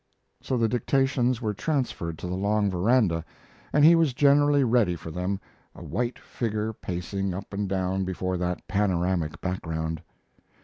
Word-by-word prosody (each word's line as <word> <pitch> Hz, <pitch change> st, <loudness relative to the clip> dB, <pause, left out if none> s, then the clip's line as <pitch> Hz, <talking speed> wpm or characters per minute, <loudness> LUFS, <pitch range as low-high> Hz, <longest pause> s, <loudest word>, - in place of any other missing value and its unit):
So 130 Hz, -, -1 dB
the 115 Hz, -1 st, +3 dB
dictations 125 Hz, 0 st, +1 dB
were 105 Hz, -1 st, 0 dB
transferred 110 Hz, -, -2 dB
to 90 Hz, -, -6 dB
the 90 Hz, -, -3 dB
long 100 Hz, +1 st, +1 dB
veranda, 95 Hz, -3 st, +2 dB, 0.5 s
and 150 Hz, +1 st, +5 dB
he 165 Hz, -, +9 dB
was 165 Hz, -6 st, +3 dB
generally 145 Hz, 0 st, +4 dB
ready 115 Hz, -7 st, +3 dB
for 80 Hz, 0 st, -8 dB
them, 90 Hz, +3 st, -2 dB, 0.4 s
a -, -, -10 dB
white 120 Hz, +2 st, -2 dB
figure 110 Hz, -1 st, -3 dB
pacing 95 Hz, 0 st, -3 dB
up 95 Hz, +2 st, -8 dB
and 100 Hz, -1 st, -2 dB
down 95 Hz, 0 st, 0 dB
before 95 Hz, 0 st, -2 dB
that 90 Hz, 0 st, -3 dB
panoramic 90 Hz, -5 st, 0 dB
background. 80 Hz, -3 st, -3 dB
100 Hz, 150 wpm, -26 LUFS, 90-125 Hz, 0.5 s, he